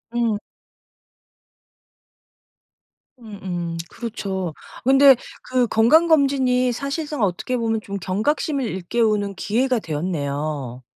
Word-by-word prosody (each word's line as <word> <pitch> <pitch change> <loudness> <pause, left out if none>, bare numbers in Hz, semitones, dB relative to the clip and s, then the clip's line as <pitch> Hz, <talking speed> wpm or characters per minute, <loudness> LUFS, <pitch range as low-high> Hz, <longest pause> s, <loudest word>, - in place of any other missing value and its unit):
음. 230 -3 +1 2.8
음 215 -4 -10
음 175 -2 -4
그렇죠. 195 -7 -4 0.3
근데 270 +1 +7 0.3
그 255 -1 +1
건강검진이 265 -1 +4
사실상 280 +1 -3
어떻게 200 +7 -1
보면 225 -2 -1
좀 200 -1 -5
경각심을 265 - -1
일깨우는 205 +1 0
기회가 245 +6 0
되었네요. 145 - -3
225 Hz, 210 characters per minute, -22 LUFS, 185-255 Hz, 2.8 s, 근데